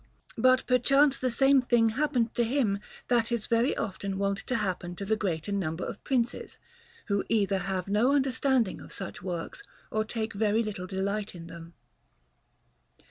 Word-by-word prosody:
But 255 0 +4
perchance 275 +3 +4
the 255 - 0
same 270 +2 +4
thing 240 -2 +3
happened 250 -2 0
to 240 - +2
him 230 -5 +1 0.3
that 235 -1 +2
is 235 -3 -1
very 235 +4 +1
often 195 -1 -3
wont 200 0 0
to 255 - 0
happen 185 -5 -2
to 200 - -5
the 220 +2 +2
greater 185 -4 -2
number 180 -4 -2
of - - -7
Princes, 245 -3 -1 0.5
who 200 -2 0
either 200 -3 +2
have 190 -1 -3
no 210 +6 +3
understanding 265 -5 +1
of - - -12
such 190 -3 -6
works 175 - -5 0.3
or 215 0 +1
take 220 0 -3
very 215 +2 +2
little 195 -4 -5
delight 200 +2 -2
in 165 -1 -9
them. 170 0 -11
215 Hz, 165 wpm, -28 LUFS, 195-245 Hz, 0.5 s, But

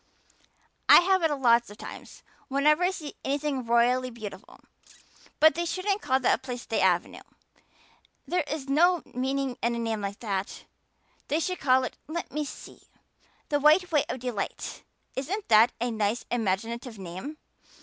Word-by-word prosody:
"I - - +10
have 380 +1 +2
it 325 -2 +2
lots 240 -5 +3
of 205 - -12
time - - -9 0.4
whenever 300 +4 +3
I 360 - +4
see 320 -6 -6
anything 280 -3 -2
royally 245 +2 +3
beautiful. 215 -5 -10 0.8
But 315 +1 +7
they 340 - -2
shouldn't 390 +4 -1
call 260 +1 +1
that - - +1
lovely - - +1
place 250 -2 -6
the 225 - -1
Avenue. 180 -2 +1 1.1
There 355 +4 +1
is 295 -2 -4
no 340 +5 +3
meaning 265 0 -2
in 235 0 0
a - - -3
name 225 -2 -2
like 200 0 -5
that. 200 -4 -3 0.6
They 300 +3 +1
should 365 +2 -2
call 260 -1 +3
it 255 - -5
let 335 +2 -5
me 300 +1 -2
see - - -10 0.7
the 290 - +1
White 315 +5 +4
Way 295 -3 +3
of 255 - -4
Delight. 245 -5 -4 0.3
Isn't 365 +11 -3
that 225 +2 +6
a 240 +1 -1
nice 220 +1 -1
imaginative 230 +2 -2
name? 190 - -7
260 Hz, 160 wpm, -27 LUFS, 230-305 Hz, 1.1 s, I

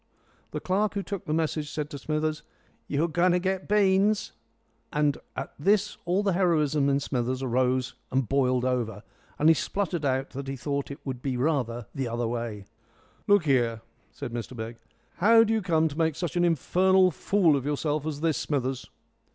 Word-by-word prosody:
The - - -4
clerk 200 +3 0
who 200 - -1
took 200 -2 -5
the - - -4
message 155 -2 -1
said 150 -1 -4
to 145 - -6
Smithers, 155 +1 -1 0.5
"You're 150 +3 +1
going 175 +2 +2
to 180 - +3
get 190 +1 -2
beans." 205 +1 +3 0.6
And 150 -1 +1 0.2
at - - -5
this 205 +5 +2
all 180 +4 +1
the 195 -2 +1
heroism 155 -6 +2
in 140 0 +2
Smithers 130 -1 -2
arose 130 +1 +1 0.2
and 130 -2 +1
boiled 130 -2 +2
over, 115 -5 -1 0.3
and 150 - +3
he 165 - +8
spluttered 175 0 -2
out 135 0 0
that 135 +1 -6
he 135 - -3
thought 140 +2 -3
it 140 - -9
would 130 -3 -4
be 130 -2 -2
rather 125 -5 0
the 135 -2 -2
other 120 0 -2
way. 115 -4 -4 0.6
"Look 205 -5 +4
here," 120 -5 +2 0.3
said 120 - -7
Mr 120 +1 -5
Begg, 115 +1 -6 0.4
"how 225 +4 +6
do 225 0 +1
you 220 - +1
come 160 -4 +2
to 145 - -9
make 160 -2 +2
such 175 -2 -4
an 175 - +2
infernal 185 +3 +3
fool 175 -2 +2
of 135 - -1
yourself 150 0 -1
as 150 -2 -4
this, 160 -2 +1
Smithers?" 130 -3 -2
150 Hz, 185 wpm, -27 LUFS, 130-180 Hz, 0.6 s, he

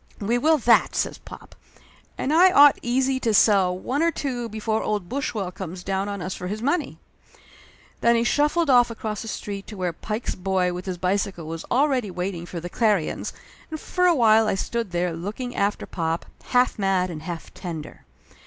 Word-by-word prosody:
"We 230 +4 0
will 315 +4 +4
that!" 240 -3 +3
says - - -1
pop. - - -13 0.6
"And 285 - -1
I 360 +4 +7
ought 290 -4 +7
easy 260 +2 +1
to 225 -4 +1
sell 190 -4 +4
one 260 +10 -2
or 335 - +4
two 250 -7 -3
before 220 0 -2
old 205 -4 -2
Bush 265 +1 -3
well 195 -4 -2
comes 185 -1 -7
down 195 +1 -2
on 200 -2 -4
us 185 - -3
for 180 - -6
his 210 +3 -4
money 290 +7 -1 0.5
!" - - -26
Then 235 0 +4
he 230 - +2
shuffled 300 +6 +2
off 245 -3 +5
across 220 -2 -5
the 225 - -7
street 200 -2 -5
to 210 - -9
where 180 -2 -2
Pike's 215 +7 -4
boy 185 -1 0
with 180 +2 -7
his 185 -1 -3
bicycle 185 -1 -1
was 165 +1 -6
already 260 -4 +2
waiting 180 -1 -4
for 175 - -6
the 175 - -6
Clarions, 205 -3 0 0.4
and 315 -1 -5
for 360 +3 +1
a 345 - +4
while 220 -3 +5
I - - +1
stood 230 +2 -3
there 175 0 -1
looking 215 +9 -5
after 200 +1 0
pop, 165 -1 -3 0.2
half 250 -2 +2
mad 190 -2 +1
and 155 -2 -7
half 165 0 -7
tender. 165 -5 -7
210 Hz, 200 wpm, -24 LUFS, 180-245 Hz, 0.6 s, I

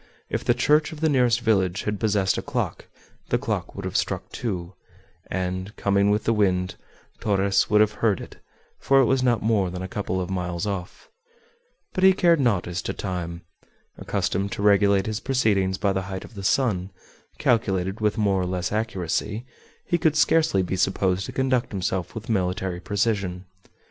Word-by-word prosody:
If - - -1
the 120 - +2
church 150 +5 +3
of 155 - -8
the 160 0 +2
nearest 125 -4 +3
village 95 -4 +1
had 105 -1 -2
possessed 100 -3 +1
a - - -2
clock, - - -3 0.4
the - - +2
clock - - -3
would - - -6
have - - -5
struck - - -1
two, 95 -6 -4 0.6
and, 95 +2 -3
coming 100 0 +2
with 105 +1 +1
the 115 - +2
wind, 90 -3 +1 0.5
Torres 100 -1 +2
would 105 0 +5
have 105 -1 +4
heard 110 -4 +2
it, - - -10 0.4
for 135 0 +4
it 135 - +5
was 130 +1 +2
not 120 -3 +2
more 105 -4 +2
than 90 +1 -5
a - - -4
couple 95 -1 -3
of 90 - -2
miles 90 0 -2
off. 95 -3 -5 0.8
But 185 - -1
he 190 0 +8
cared 170 -3 +3
not 115 -9 +2
as 90 +1 -3
to - - -3
time. 85 -3 -4 0.5
Accustomed 100 +2 -2
to 100 - -4
regulate 100 -1 +4
his 110 0 -2
proceedings 100 -8 +1
by 100 0 +1
the 95 - -1
height 95 -1 -5
of - - -15
the 100 -2 -8
sun, 95 -5 +1 0.5
calculated 95 -3 0
with 105 +1 +1
more 100 -3 +2
or 90 - -1
less 90 0 -2
accuracy, 105 +1 -2 0.4
he 175 - 0
could 155 -1 +2
scarcely 155 -10 +3
be 95 +1 -2
supposed 95 0 +1
to - - -6
conduct 130 -1 0
himself 95 -3 -2
with 110 0 -7
military 95 -3 -1
precision. 100 -2 -1
100 Hz, 185 wpm, -24 LUFS, 95-115 Hz, 0.8 s, he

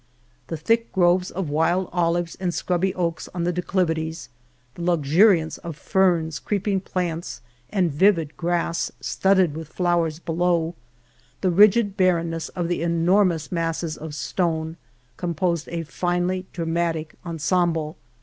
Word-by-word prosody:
The 165 - -4
thick 230 +9 +1
groves 180 -1 +3
of 175 -5 -4
wild 170 +4 +1
olives 170 -1 0
and 185 -2 -1
scrubby 180 +2 0
oaks 170 -3 -2
on 175 - -1
the 175 +1 0
declivities; 165 -3 -1 0.4
the 170 - -9
luxu 170 +1 +4
riance 165 -6 +1
of 170 -3 -7
ferns, 170 -6 +1
creeping 200 -1 -1
plants, 175 -8 -3 0.3
and 185 -5 +1
vivid 165 -1 +2
grass, 170 -1 -1
studded 190 -5 +2
with 160 -1 -6
flowers 170 -1 0
below; 170 0 0 0.7
the 185 - +2
rigid 205 +2 +5
barrenness 170 -3 +1
of 175 -2 -3
the 175 -1 -1
enormous 170 0 +2
masses 165 -2 -2
of 155 -1 -7
stone, 160 -1 -1 0.4
composed 170 -1 -1
a 170 -1 -3
finely 180 +3 -1
dramatic 165 -2 -2
ensemble. 165 -1 0
170 Hz, 130 wpm, -23 LUFS, 165-185 Hz, 0.7 s, rigid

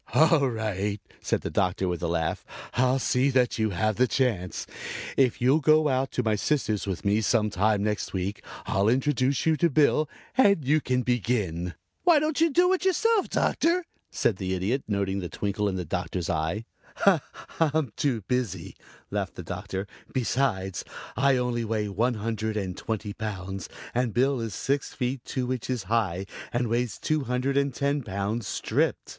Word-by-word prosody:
"All 160 -4 +5
right," 105 -3 -2 0.2
said - - 0
the - - -4
Doctor 95 0 +1
with 90 -2 -2
a 85 - 0
laugh. 80 -1 -1 0.3
"I'll 130 +1 +3
see 130 +2 +2
that 125 -3 +2
you 110 0 +2
have 105 +3 0
the 125 +1 +4
chance. 115 -9 0 0.5
If 130 -3 +3
you'll 130 +5 +4
go 155 +1 +4
out 130 0 +1
to 125 - 0
my 110 -1 +2
sister's 110 -3 0
with 95 -1 -3
me 105 +2 +3
some 110 -1 +2
time 100 +2 +2
next 105 -1 -1
week 95 +2 -3 0.2
I'll 100 +2 +2
introduce 130 0 +1
you 160 -1 +4
to 170 - +3
Bill 150 +1 +3 0.3
and 200 - +4
you 150 +3 +3
can 125 -1 0
begin." 100 -8 -1 0.3
"Why 345 -3 +6
don't 305 +1 0
you 330 - +5
do 355 +5 +4
it 375 - -1
yourself, 410 +3 +2
Doctor?" 340 +2 +1 0.3
asked 105 - +1
the 95 0 -2
Idiot, 105 +9 -1
noting 100 -2 0
the 90 -3 -4
twinkle 105 0 -1
in 95 - -3
the 90 -2 -3
Doctor's 90 -2 -2
eye. 85 +7 -1 0.9
"I'm 155 -7 +1
too 130 -6 0
busy," 105 -6 -2 0.4
laughed - - -2
the - - -7
Doctor. 95 +1 -4 0.3
"Besides 115 -8 0 0.3
I 135 0 +3
only 125 -1 0
weigh 110 -2 -1
one 115 +5 +1
hundred 110 0 -2
and 95 -3 -3
twenty 110 -2 -4
pounds 95 -3 -5 0.2
and 120 -2 0
Bill 135 +2 +3
is 110 -4 -4
six 140 +1 -1
feet 125 -1 -2
two 130 -1 -1
inches 125 -2 -3
high 95 -3 0 0.3
and 120 -1 0
weighs 120 -3 0
two 155 -3 0
hundred 125 +3 0
and 140 0 +2
ten 140 +3 0
pounds 100 0 -3
stripped. - - 0
115 Hz, 175 wpm, -27 LUFS, 100-135 Hz, 0.9 s, Why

